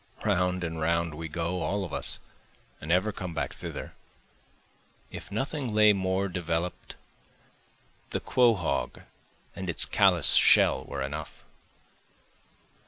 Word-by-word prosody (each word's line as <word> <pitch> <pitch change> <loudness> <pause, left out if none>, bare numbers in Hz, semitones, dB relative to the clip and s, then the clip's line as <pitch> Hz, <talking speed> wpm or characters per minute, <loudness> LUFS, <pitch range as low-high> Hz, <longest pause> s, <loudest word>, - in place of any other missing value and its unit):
(Round 90 -3 0
and 80 -1 -4
round 85 0 0
we 80 +2 -6
go, 85 +3 -3
all 100 0 -2
of 85 - -10
us, - - 0 0.6
and 75 - -4
ever 95 +5 +2
come 90 -4 -7
back 75 -3 -3
thither,) - - -7 1.2
If - - -10
nothing 130 +1 -3
lay 105 -1 +6
more 95 0 -1
develop'd 85 -1 -4 1.1
the - - -2
quahaug 115 -9 0 0.5
in 95 -2 -6
its 85 - +2
callous - - +5
shell - - +5
were 70 -1 -5
enough. 75 +3 -7
90 Hz, 120 wpm, -27 LUFS, 80-100 Hz, 1.2 s, lay